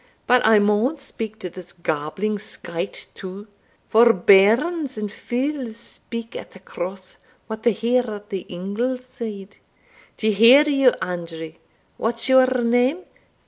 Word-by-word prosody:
But 250 0 +4
I 220 -1 +6
maun 210 +8 +2
speak 225 -5 -6
to 180 - -4
this 180 -1 -10
gabbling 170 +6 -3
skyte 170 -1 -4
too, 195 +3 -9 0.4
for 230 +1 +6
bairns 235 - +3
and 210 -1 -4
fules 255 -1 -3
speak 230 0 -9
at - - -8
the 190 - -14
Cross 185 0 -7 0.3
what 220 -1 -7
they 235 - +3
hear 240 +3 0
at 210 0 -9
the 190 -2 -5
ingle 205 +8 -3
side. 230 -6 -9 0.6
D'ye 220 0 +1
hear, 230 +8 +7
you, 275 -3 +4
Andrew 165 -3 -6 0.4
what's 230 +1 -1
your 260 -1 +6 0.2
name? 245 +9 +1
220 Hz, 140 wpm, -22 LUFS, 195-250 Hz, 0.6 s, hear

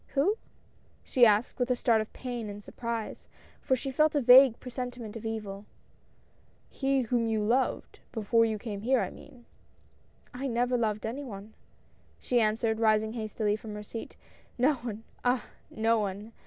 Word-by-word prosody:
" - - -33
Who," 390 +11 +2 0.6
she 245 -2 +5
asked, 215 +5 +1
with 245 +1 0
a 250 - +3
start 230 -2 +3
of 215 - -7
pain 245 -4 -5
and 205 0 -8
surprise, 230 -1 -5 0.3
for 260 - +2
she 270 +2 -4
felt 310 +3 +3
a - - +4
vague 250 0 +8
presentiment 245 -3 -6
of 225 0 -5
evil. 210 -2 -5 1.1
"He 270 -1 +1
whom 235 -1 0
you 220 -1 0
loved 245 +5 0
— - - -36
before 230 +1 +2
you 220 -1 0
came 205 -2 -6
here 255 +3 +3
I - - -3
mean." 255 -5 -15 0.4
" - - -34
I - - 0
never 245 0 +1
loved 215 -3 0
any 250 +6 -4
one," 210 -3 -9 0.7
she 245 -2 +1
answered, 220 +1 +1
rising 220 -1 +2
hastily 215 -2 -1
from 215 -1 -8
her 210 - -6
seat 225 +2 -8 0.2
— - - -31
"no 305 - +4
one 225 -3 -6
— - - -31
ah! 245 -2 +1 0.2
no 225 +1 +1
one!" 205 +2 -4
230 Hz, 180 wpm, -29 LUFS, 215-250 Hz, 1.1 s, vague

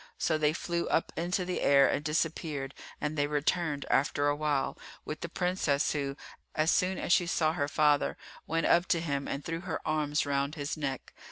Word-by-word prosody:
So 160 - +1
they 150 -1 +2
flew 170 +1 -2
up 165 - +1
into 180 +2 -1
the 180 0 -2
air 140 -1 +6
and 145 - 0
disappeared 150 -2 -2 0.3
and 150 +1 -2
they 145 -1 +1
returned 150 0 0
after 145 +1 +2
a 145 - +1
while, 145 -2 0 0.3
with 155 - -5
the 170 - -4
Princess 180 -5 +1
who, 140 -2 -2 0.4
as 155 +1 +3
soon 185 0 +2
as - - +1
she 175 -3 +3
saw 160 -2 +2
her 145 -4 -1
father, 150 -1 +2 0.3
went 165 0 0
up 175 +1 +4
to 170 - +2
him 140 -4 -2
and 140 +1 -4
threw 165 0 -3
her 180 +1 -4
arms 150 -1 +1
round 140 +1 0
his 145 +1 -3
neck. 140 -4 -4
155 Hz, 195 wpm, -30 LUFS, 145-170 Hz, 0.4 s, air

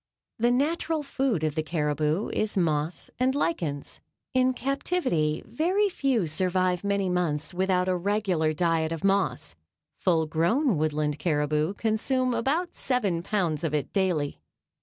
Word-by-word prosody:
The 235 +2 +3
natural 310 +4 0
food 265 - -1
of 155 -1 0
the 155 - 0
caribou 155 +2 0
is 215 -1 -1
moss 155 -1 0
and 260 +1 +2
lichens. 165 - -2 0.3
In 255 0 +3
captivity 255 - 0
very 370 - +1
few 265 - +1
survive 180 +2 0
many 200 -1 0
months 165 -4 -1
without 185 0 +1
a 185 - +2
regular 185 -4 0
diet 165 -1 +1
of 165 -2 -4
moss. 195 - +1 0.5
Full 165 -3 +2
grown 175 - +2
Woodland 150 -1 0
caribou 150 +2 0
consume 250 +4 0
about 295 +10 0
seven 205 -10 0
pounds 175 -5 -1
of 155 -2 0
it 145 -3 -2
daily. 180 -7 0
185 Hz, 140 wpm, -27 LUFS, 155-245 Hz, 0.5 s, The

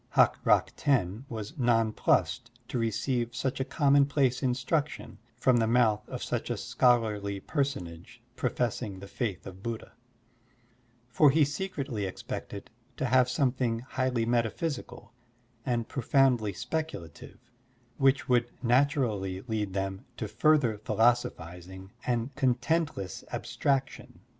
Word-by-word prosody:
Hak - - +4
Rak - - +3
Ten 120 -4 0
was 110 -1 -5
nonplused 115 -3 +2 0.2
to 125 - -2
receive 115 +2 -1
such 130 +4 -2
a - - +1
commonplace 140 -2 +2
instruction 135 +4 -1 0.2
from 125 0 +3
the 115 -1 +2
mouth 110 -3 +2
of - - -5
such - - -3
a - - -1
scholarly 105 -5 +1
personage 125 - -4 0.2
professing 120 -5 -2
the 100 +1 -9
faith 100 - -3
of 95 0 -10
Buddha; 115 +1 -5 1.2
for 145 +6 +6
he 150 +2 +4
secretly 145 - -3
expected 100 +1 -7 0.3
to - - -1
have 130 0 +4
something 125 -3 +1
highly 130 -2 -1
metaphysical 120 +5 -2 0.5
and 120 -2 0
profotmdly 125 -5 +2
speculative, 155 - -5 0.6
which 135 -1 +3
would 120 -1 +2
naturally 120 - +1
lead 105 -4 -3
them 95 +2 -3
to 110 - -3
further 120 -1 +2
philosophizing 95 -5 -1 0.2
and 120 +2 -1
contentless 130 - 0
abstrac 135 -1 0
tion. - - -14
120 Hz, 120 wpm, -29 LUFS, 105-135 Hz, 1.2 s, for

